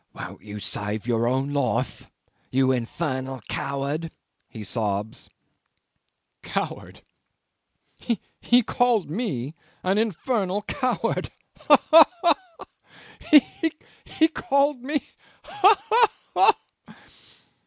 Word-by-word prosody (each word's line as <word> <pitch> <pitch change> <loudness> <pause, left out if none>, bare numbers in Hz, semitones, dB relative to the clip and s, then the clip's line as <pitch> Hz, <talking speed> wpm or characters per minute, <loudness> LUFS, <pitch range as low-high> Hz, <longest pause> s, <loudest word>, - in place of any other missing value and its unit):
'Won't - - -9
you 105 0 -9
save 105 +1 -4
your 115 -1 0
own 135 +3 -1
life 130 -7 -2 0.4
you 130 0 +2
infernal 130 +1 -3
coward?' 140 +4 -3 0.4
he 110 - -9
sobs. 105 0 -3 1.1
Coward! - - -5 1.4
He 245 0 +3
called 235 - +1
me 155 - -3 0.3
an 190 +3 +1
infernal 210 -1 -1
coward! 255 +3 -2 0.3
Ha! - - +6
ha! 320 0 +10 0.2
ha! 335 -3 +6 0.2
ha! 305 +2 0 0.5
He 320 - +5
called 280 -3 0
me 290 +3 -2 0.4
ha! 410 0 +4
ha! 455 +1 +6 0.8
ha! - - -18
170 Hz, 95 wpm, -24 LUFS, -, 1.4 s, ha